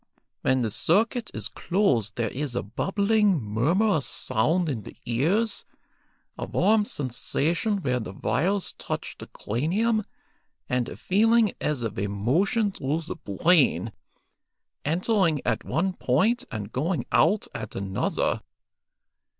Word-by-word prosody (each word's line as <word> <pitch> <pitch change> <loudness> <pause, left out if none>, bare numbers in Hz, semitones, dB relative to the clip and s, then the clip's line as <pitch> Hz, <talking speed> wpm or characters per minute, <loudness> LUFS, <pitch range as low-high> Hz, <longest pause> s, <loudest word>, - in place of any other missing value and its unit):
When 130 -1 +2
the 110 - -1
circuit 220 - +1
is 110 -1 -4
closed 130 - 0
there 115 -3 -1
is 135 -2 -4
a - - -1
bubbling, 200 - +1
murmurous 145 - +1
sound 165 +11 +1
in 130 -8 -2
the - - -12
ears, 180 - +1 0.8
a - - -3
warm 210 +2 +3
sensation 165 - -1
where 125 -2 +1
the 110 - -6
wires 190 - 0
touch - - -4
the - - -8
cranium, 205 - 0 0.6
and 125 -1 0
a - - -8
feeling 220 +2 +3
as 145 -5 -1
of 110 -4 -3
a 100 - 0
motion 170 - +1
through 150 -1 -2
the 165 - -5
brain, 135 - +2 0.9
entering 170 0 +2
at - - 0
one 185 +4 0
point 210 - +1
and 105 -1 -5
going 160 +7 -1
out 210 +1 +3
at 110 -3 -6
another. 95 -1 -1
160 Hz, 130 wpm, -26 LUFS, 120-200 Hz, 0.9 s, warm